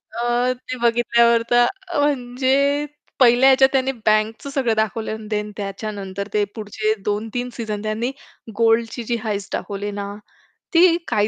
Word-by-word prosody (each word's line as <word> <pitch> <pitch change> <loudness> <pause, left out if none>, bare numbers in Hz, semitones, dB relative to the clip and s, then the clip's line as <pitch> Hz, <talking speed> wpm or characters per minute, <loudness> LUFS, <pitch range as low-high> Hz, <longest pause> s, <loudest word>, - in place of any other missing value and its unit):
अ, 240 +1 +1
ते 255 0 -8
बघितल्यावर 235 0 +3
तर 240 0 +6 0.3
म्हणजे 280 +1 +1 0.3
पहिल्या 250 +1 +6
ह्याच्यात 265 0 +5
त्यांनी 265 0 +1
बँकचं 215 +4 +1
सगळं 265 -5 0
दाखवलं 220 0 -1
आणि 220 -1 -8
देन 210 -1 -3
त्याच्यानंतर 200 -1 -5
ते 210 - +2
पुढचे 215 0 -1
2-3 225 +4 -2
सीझन 215 -3 -4
त्यांनी 220 +4 -2 0.5
गोल्डची 230 +1 +2
जी 235 +1 -1
हाइस्ट 205 -3 -3
दाखवली 205 0 -4
ना 200 0 -5 0.6
ती 335 0 +6
काय 210 -3 +1
230 Hz, 140 wpm, -21 LUFS, 210-250 Hz, 0.6 s, तर